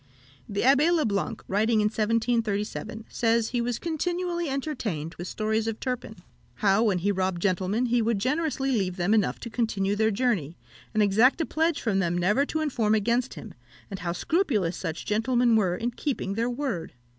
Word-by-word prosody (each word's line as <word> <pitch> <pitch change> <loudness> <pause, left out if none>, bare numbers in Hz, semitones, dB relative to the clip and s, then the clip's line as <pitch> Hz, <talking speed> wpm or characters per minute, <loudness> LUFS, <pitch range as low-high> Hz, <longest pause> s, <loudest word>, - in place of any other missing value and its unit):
The 200 - -1
Abbé 280 +6 +5
le 330 -3 +2
Blanc, 210 +2 -2
writing 220 +3 +2
in 210 - +2
1737, 220 0 -1
says 230 -1 +1
he 245 -1 -1
was 235 0 -1
continually 345 +1 -2
entertained 235 - -3
with 175 - -7
stories 220 +2 -1
of 225 -1 -3
Turpin 250 -4 -4 0.4
how, 200 0 +3
when 210 -5 +2
he 195 +4 +1
robbed 190 -2 -1
gentlemen, 190 +5 0
he 240 0 +2
would 225 -1 +1
generously 270 +3 0
leave 190 -6 0
them 180 +4 +1
enough 215 -2 +1
to 235 - -6
continue 205 -4 0
their 220 +1 +2
journey, 200 - -1 0.4
and 215 - +4
exact 220 - +4
a 325 - +1
pledge 320 +1 0
from 205 -5 +1
them 175 -2 0
never 210 +11 +2
to 315 - -2
inform 230 -8 +1
against 235 +4 0
him, 215 - -9 0.4
and 195 - -5
how 170 0 -2
scrupulous 215 - 0
such 165 -3 -5
gentlemen 235 +2 +2
were 190 -5 +2
in 235 +6 -2
keeping 240 -6 -3
their 230 +3 0
word. 245 - -3
225 Hz, 180 wpm, -26 LUFS, 200-255 Hz, 0.4 s, Abbé